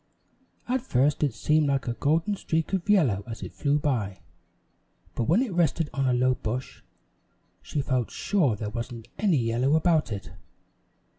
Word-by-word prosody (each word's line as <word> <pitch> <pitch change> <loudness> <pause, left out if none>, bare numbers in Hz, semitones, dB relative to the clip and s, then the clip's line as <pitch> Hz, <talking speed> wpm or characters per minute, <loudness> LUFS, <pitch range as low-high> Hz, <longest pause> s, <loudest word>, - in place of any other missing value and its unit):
At 255 +1 0
first 145 - +1
it 145 -3 +2
seemed 150 +6 +2
like 140 -1 0
a 120 - 0
golden 165 - +1
streak 165 -2 -2
of 190 +1 -1
yellow 135 - +3
as 115 -1 -7
it - - -7
flew 145 0 +1
by, 115 -10 -1 0.9
but 120 - -1
when 185 - +3
it 230 -8 -4
rested 165 -2 +1
on 135 -1 0
a - - +2
low 130 +1 +3
bush, 125 +2 -5 0.8
she 145 - -3
felt 130 -4 0
sure 165 - +1
there 105 0 -5
wasn't 115 0 -6
any 195 -7 +3
yellow 120 +4 +1
about 160 -5 +2
it. 100 -2 -5
140 Hz, 165 wpm, -26 LUFS, 120-165 Hz, 0.9 s, yellow